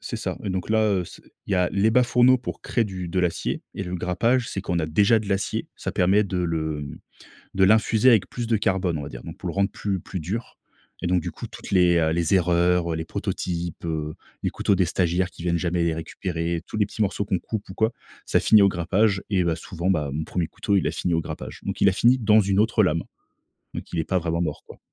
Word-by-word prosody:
c'est -, -, -5 dB
ça! -, -, -4 dB
Et 100 Hz, -, -2 dB
donc 95 Hz, 0 st, -3 dB
là, 110 Hz, 0 st, +3 dB, 0.2 s
heu, 90 Hz, -, -4 dB
c'est -, -, -13 dB, 0.2 s
il -, -, -3 dB
y -, -, +4 dB
a 90 Hz, -1 st, +2 dB
les 100 Hz, +3 st, +3 dB
bas 125 Hz, +2 st, +5 dB
fourneaux 125 Hz, +1 st, +5 dB
pour 125 Hz, -, -6 dB
créer 120 Hz, -, 0 dB
du 95 Hz, -3 st, -5 dB
de 90 Hz, +2 st, -2 dB
l'acier. 90 Hz, -2 st, -1 dB
Et 100 Hz, -, -4 dB
le 90 Hz, -1 st, -5 dB
grappage, 115 Hz, +8 st, +1 dB
c'est 95 Hz, -, -3 dB
qu'on 85 Hz, -1 st, -2 dB
a 80 Hz, -, 0 dB
déjà 100 Hz, +8 st, +4 dB
de 105 Hz, -, -7 dB
l'acier. 100 Hz, 0 st, -1 dB
Ça -, -, -4 dB
permet 100 Hz, +4 st, +3 dB
de 95 Hz, -, -4 dB
le, 80 Hz, -3 st, -1 dB
hem, 70 Hz, -2 st, -7 dB, 0.6 s
de 95 Hz, -, +2 dB
l'infuser 110 Hz, +4 st, +4 dB
avec 110 Hz, -5 st, +4 dB
plus 120 Hz, -1 st, -4 dB
de 115 Hz, -2 st, +2 dB
carbone, 95 Hz, -4 st, 0 dB
on 75 Hz, -, -5 dB
va -, -, -6 dB
dire. -, -, -9 dB
Donc, -, -, -9 dB
pour -, -, -6 dB
le -, -, -3 dB
rendre 100 Hz, 0 st, +1 dB
plus 95 Hz, -4 st, -3 dB
plus 95 Hz, -, -6 dB
dur. 100 Hz, +9 st, -5 dB, 0.4 s
Et 90 Hz, -, -1 dB
donc, 90 Hz, -1 st, +2 dB
du -, -, -5 dB
coup, -, -, -8 dB
toutes -, -, -10 dB
les, 90 Hz, -2 st, +4 dB
heu, 80 Hz, -1 st, +2 dB
les 85 Hz, +2 st, +1 dB
erreurs, 90 Hz, -1 st, +2 dB
heu, -, -, -2 dB
les 80 Hz, -, -4 dB
prototypes, 85 Hz, 0 st, -4 dB
heu, 75 Hz, -2 st, -3 dB, 0.3 s
les -, -, +1 dB
couteaux 100 Hz, -, +1 dB
des 95 Hz, -, +3 dB
stagiaires 90 Hz, +1 st, 0 dB
qui 85 Hz, -, -11 dB
viennent 85 Hz, -1 st, +1 dB
jamais 85 Hz, 0 st, 0 dB
les 80 Hz, -, +1 dB
récupérer, 85 Hz, 0 st, -3 dB
tous -, -, -7 dB
les 105 Hz, -, +3 dB
petits 110 Hz, -, -6 dB
morceaux 105 Hz, 0 st, 0 dB
qu'on 95 Hz, -2 st, 0 dB
coupe 105 Hz, +3 st, -5 dB
ou 95 Hz, -, -7 dB
quoi, 110 Hz, +3 st, +1 dB, 0.3 s
ça -, -, +2 dB
finit 110 Hz, -, +6 dB
au 100 Hz, -, +6 dB
grappage 95 Hz, +3 st, +1 dB
et 95 Hz, -3 st, +2 dB
bah, 85 Hz, -, +1 dB
souvent, 85 Hz, +2 st, -4 dB
bah, 75 Hz, -6 st, +1 dB
mon 80 Hz, +2 st, -3 dB
premier 85 Hz, -3 st, -2 dB
couteau, 100 Hz, -, -1 dB
il 95 Hz, -, +2 dB
a -, -, 0 dB
fini 90 Hz, -, -1 dB
au 80 Hz, -, +1 dB
grappage. -, -, -7 dB
Donc -, -, -4 dB
il 100 Hz, -, +6 dB
a 95 Hz, -, -1 dB
fini 120 Hz, +6 st, +4 dB
dans 110 Hz, -2 st, +4 dB
une 100 Hz, 0 st, +1 dB
autre 110 Hz, 0 st, +3 dB
lame. 85 Hz, -3 st, +1 dB, 0.7 s
Donc -, -, -7 dB
il -, -, -3 dB
n'est 80 Hz, -, 0 dB
pas 95 Hz, -, +1 dB
vraiment 85 Hz, 0 st, -1 dB
mort 75 Hz, -4 st, -3 dB
quoi. -, -, -13 dB
90 Hz, 260 wpm, -24 LUFS, 85-105 Hz, 0.7 s, finit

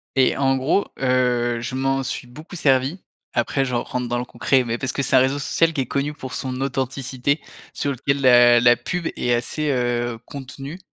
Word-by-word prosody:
Et, 130 Hz, -1 st, +3 dB
en 135 Hz, -1 st, +2 dB
gros, 150 Hz, +10 st, +1 dB
heu, 125 Hz, -2 st, +1 dB
je 130 Hz, +2 st, -4 dB
m'en 135 Hz, 0 st, 0 dB
suis 125 Hz, -1 st, -4 dB
beaucoup 155 Hz, +8 st, -11 dB
servi. 135 Hz, +3 st, +1 dB, 0.3 s
Après, 135 Hz, -, +1 dB
je 125 Hz, -2 st, -2 dB
rentre 125 Hz, +1 st, -2 dB
dans 120 Hz, 0 st, -1 dB
le 125 Hz, -, -3 dB
concret 130 Hz, +1 st, +1 dB
mais 120 Hz, 0 st, -3 dB
parce 130 Hz, -, -2 dB
que 140 Hz, -, -2 dB
c'est 130 Hz, -, +1 dB
un -, -, +8 dB
réseau 130 Hz, +2 st, +2 dB
social 165 Hz, +4 st, +1 dB
qui 145 Hz, -4 st, -1 dB
est -, -, -2 dB
connu 140 Hz, +4 st, -2 dB
pour 130 Hz, -3 st, -8 dB
son 130 Hz, -1 st, -4 dB
authenticité, 135 Hz, +1 st, -1 dB, 0.3 s
sur 140 Hz, -, -2 dB
lequel 140 Hz, +2 st, -1 dB
la 120 Hz, -2 st, +7 dB
la 120 Hz, 0 st, +6 dB
pub 175 Hz, +6 st, -3 dB
est 120 Hz, -, 0 dB
assez, 145 Hz, +6 st, -1 dB
heu, 120 Hz, -2 st, 0 dB
contenue, 140 Hz, +4 st, -8 dB
130 Hz, 205 wpm, -22 LUFS, 125-140 Hz, 0.3 s, un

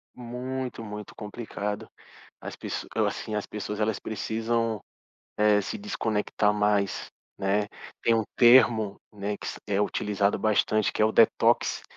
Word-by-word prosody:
Muito 125 Hz, 0 st, -5 dB
muito 105 Hz, -1 st, -7 dB
complicado, 105 Hz, -1 st, -5 dB, 0.5 s
as -, -, -7 dB
pes -, -, -5 dB
assim, 110 Hz, -, -1 dB
as 105 Hz, -, -2 dB
pessoas 105 Hz, 0 st, -5 dB
elas 110 Hz, -1 st, +1 dB
precisam, 115 Hz, 0 st, -1 dB, 0.6 s
eh, 105 Hz, -1 st, +4 dB
se 100 Hz, -, -4 dB
desconectar 110 Hz, -, 0 dB
mais, 105 Hz, -1 st, +1 dB, 0.3 s
né. 100 Hz, +1 st, +1 dB, 0.3 s
Tem 115 Hz, -, +4 dB
um 110 Hz, -, +2 dB
termo, 120 Hz, -4 st, +6 dB, 0.2 s
né, 100 Hz, 0 st, -3 dB
que -, -, -9 dB
se -, -, -6 dB
é 100 Hz, -1 st, +1 dB
utilizado 105 Hz, -1 st, +1 dB
bastante 110 Hz, 0 st, +2 dB
que -, -, 0 dB
é -, -, +7 dB
o 110 Hz, -, +2 dB
detox, 115 Hz, -, +3 dB
105 Hz, 140 wpm, -27 LUFS, 105-115 Hz, 0.6 s, é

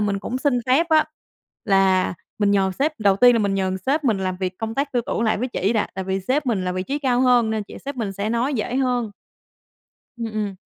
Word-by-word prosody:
mình 205 Hz, -1 st, 0 dB
cũng 245 Hz, +5 st, -4 dB
xin 265 Hz, -3 st, +1 dB
phép 275 Hz, +7 st, +3 dB
á 310 Hz, -1 st, +4 dB, 0.6 s
là 190 Hz, -3 st, +3 dB, 0.2 s
mình 205 Hz, -1 st, +2 dB
nhờ 195 Hz, -1 st, +2 dB
sếp. 300 Hz, -1 st, -1 dB
Đầu 200 Hz, -2 st, +3 dB
tiên 245 Hz, +3 st, +6 dB
là 230 Hz, -, +2 dB
mình 200 Hz, -2 st, 0 dB
nhờ, 195 Hz, -1 st, 0 dB
ừm, 190 Hz, 0 st, -2 dB
sếp 280 Hz, +10 st, -1 dB
mình 225 Hz, -7 st, +2 dB
làm 185 Hz, -1 st, -2 dB
việc 185 Hz, 0 st, -4 dB
công 225 Hz, 0 st, -4 dB
tác 280 Hz, 0 st, -2 dB
tư 245 Hz, -, +1 dB
tưởng 225 Hz, -, -1 dB
lại 220 Hz, -2 st, +1 dB
với 250 Hz, -, -2 dB
chỉ 210 Hz, -3 st, 0 dB
đã, 215 Hz, -, +1 dB
tại 190 Hz, -, -4 dB
vì 190 Hz, +1 st, -2 dB
sếp 265 Hz, +8 st, -1 dB
mình 205 Hz, -6 st, 0 dB
là 180 Hz, -, -1 dB
vị 185 Hz, -, -2 dB
trí 275 Hz, +9 st, -3 dB
cao 255 Hz, -4 st, +1 dB
hơn 245 Hz, -3 st, +4 dB
nên 220 Hz, -, -1 dB
là -, -, -2 dB
chị -, -, -9 dB
sếp 280 Hz, -1 st, -5 dB
mình 215 Hz, -5 st, -3 dB
sẽ 200 Hz, +2 st, -3 dB
nói 240 Hz, +5 st, 0 dB
dễ 240 Hz, +2 st, -2 dB
hơn. 250 Hz, -4 st, 0 dB, 1.1 s
Ừm, 235 Hz, -, -4 dB
ừ. 210 Hz, -2 st, -2 dB
220 Hz, 265 wpm, -22 LUFS, 195-255 Hz, 1.1 s, tiên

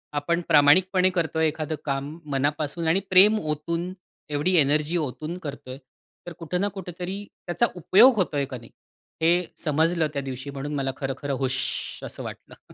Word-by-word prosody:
आपण 170 Hz, +4 st, 0 dB
प्रामाणिकपणे 180 Hz, +5 st, +5 dB
करतोय 160 Hz, -3 st, 0 dB
एखादं 155 Hz, 0 st, -3 dB
काम 140 Hz, +3 st, -3 dB
मनापासून 145 Hz, +4 st, -1 dB
आणि 175 Hz, +4 st, +3 dB
प्रेम 205 Hz, +4 st, +6 dB
ओतून 165 Hz, +4 st, -3 dB, 0.4 s
एवढी 150 Hz, +6 st, +1 dB
एनर्जी 150 Hz, +3 st, +2 dB
ओतून 155 Hz, +4 st, -4 dB
करतोय. 140 Hz, -5 st, -7 dB, 0.5 s
तर 175 Hz, -, -6 dB
कुठे 170 Hz, +2 st, -2 dB
ना 200 Hz, +3 st, +1 dB
कुठेतरी 185 Hz, +2 st, -6 dB, 0.2 s
त्याचा 175 Hz, +7 st, +1 dB
उपयोग 215 Hz, -, +6 dB
होतोय 150 Hz, -8 st, 0 dB
का 130 Hz, -2 st, -7 dB
नाही, 115 Hz, -1 st, -15 dB, 0.5 s
हे 175 Hz, +2 st, +4 dB, 0.2 s
समजलं 160 Hz, +1 st, +2 dB
त्या 140 Hz, -, -2 dB
दिवशी 135 Hz, +1 st, -6 dB
म्हणून 140 Hz, +2 st, -5 dB
मला 135 Hz, -1 st, -1 dB
खरं-खरं 140 Hz, 0 st, -3 dB
हूश! 130 Hz, 0 st, 0 dB, 0.4 s
असं -, -, -7 dB
वाटलं. -, -, -11 dB
155 Hz, 150 wpm, -25 LUFS, 140-175 Hz, 0.5 s, प्रेम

